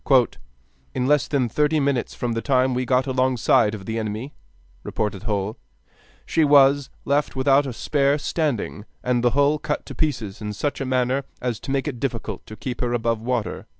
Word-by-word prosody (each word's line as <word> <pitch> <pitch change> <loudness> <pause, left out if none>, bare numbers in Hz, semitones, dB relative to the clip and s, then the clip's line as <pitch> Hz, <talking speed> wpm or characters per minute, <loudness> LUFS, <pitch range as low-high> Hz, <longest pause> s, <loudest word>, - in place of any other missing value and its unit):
"In 125 - 0
less 145 +1 +3
than 135 -4 +1
thirty 150 +5 +1
minutes 140 -4 0
from 120 - -2
the 115 0 -1
time 130 -1 +2
we 125 0 -1
got 130 +1 +3
alongside 130 -3 +2
of 95 -3 -9
the 115 +2 -2
enemy," 110 +6 -4 0.5
reported 105 -3 -3
Hull, 105 +1 -2 0.7
"she 160 - +2
was 140 -1 +5 0.2
left 145 +1 +1
without 135 +1 +3
a - - -3
spar 140 +3 +1
standing, 145 -9 -2 0.2
and 125 -1 +1
the 120 - +5
hull 145 +1 +3
cut 150 - -3
to - - -8
pieces 115 -11 -2
in 105 0 -4
such 140 +6 -2
a - - -1
manner 130 +1 +1
as 120 -4 -2
to - - -9
make 135 +1 0
it 130 -5 -4
difficult 115 -6 -3
to 110 - -8
keep 125 +2 -5
her 120 -1 0
above 115 -1 0
water." 120 -1 -2
130 Hz, 185 wpm, -23 LUFS, 115-140 Hz, 0.7 s, was